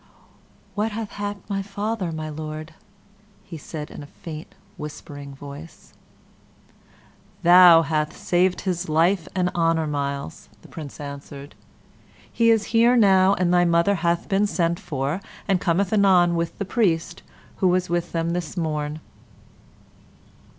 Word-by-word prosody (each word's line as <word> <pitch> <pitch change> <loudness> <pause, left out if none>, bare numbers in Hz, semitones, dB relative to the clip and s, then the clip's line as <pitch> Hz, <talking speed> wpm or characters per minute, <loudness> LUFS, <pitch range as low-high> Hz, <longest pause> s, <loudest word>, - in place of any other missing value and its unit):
"What 215 +1 -1
hath 215 -1 -5
happed 205 0 -6
my 195 -1 -2
father, 200 -1 -3
my 155 -1 -5
Lord?" 155 +1 -7 0.8
said 150 0 -7
he, - - -12
in - - -8
a 145 - -10
faint, 155 +1 -10 0.2
whispering 145 -2 -9
voice. 145 +3 -11 1.5
"Thou 175 -1 +8
hath 155 0 -1
saved 180 +1 +1
his 180 -2 -2
life 165 +3 +2
and 180 -1 +1
honor, 165 -2 +1
Myles," 140 - -4
the - - -14
Prince 150 -4 -9
answered. 140 0 -8 0.8
"He 230 -1 +3
is 225 -2 +4
here 235 +2 +5
now, 195 -3 +5
and 180 -2 +1
thy 175 0 +5
mother 170 +3 +3
hath 170 -2 0
been 200 0 +2
sent 170 -1 0
for, 145 +4 -3 0.3
and 190 -3 +1
cometh 185 +3 +1
anon 185 -4 +4
with 170 0 -2
the 200 - -3
priest 180 -5 0 0.4
who 190 - +2
was 180 0 +2
with 175 0 -2
them 165 0 -1
this 175 0 -4
morn." 155 -2 -2
170 Hz, 140 wpm, -23 LUFS, 155-195 Hz, 1.5 s, Thou